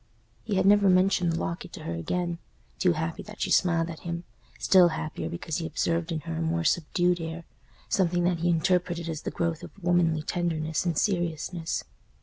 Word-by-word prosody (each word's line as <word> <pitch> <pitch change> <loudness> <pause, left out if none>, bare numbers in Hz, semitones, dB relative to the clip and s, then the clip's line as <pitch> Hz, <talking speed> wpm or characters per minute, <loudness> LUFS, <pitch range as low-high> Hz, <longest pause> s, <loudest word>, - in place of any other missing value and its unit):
He 205 - -2
had 190 0 +2
never 200 0 +6
mentioned 185 -1 +3
the 165 - -1
locket 170 +1 -4
to - - -8
her 85 - -3
again; 170 - -2 0.4
too 180 -2 +4
happy 160 +1 -3
that 210 0 -11
she - - -1
smiled 170 -2 +3
at 165 -2 -7
him—still 170 - +1
happier 160 -1 -4
because 170 -2 -4
he 165 -2 -3
observed 165 +1 -1
in 160 -2 -2
her 165 0 -5
a - - -2
more 165 +1 0
subdued 175 +2 +1
air, 165 +1 -5 0.4
something 175 -2 +1
that 175 -1 +1
he 175 +1 +1
interpreted 170 0 +1
as 160 -2 -4
the - - -3
growth 170 -2 -2
of - - -8
womanly 170 -3 +2
tenderness 160 -1 -1
and 165 -3 0
seriousness. 175 -3 -1
170 Hz, 185 wpm, -27 LUFS, 160-175 Hz, 0.4 s, never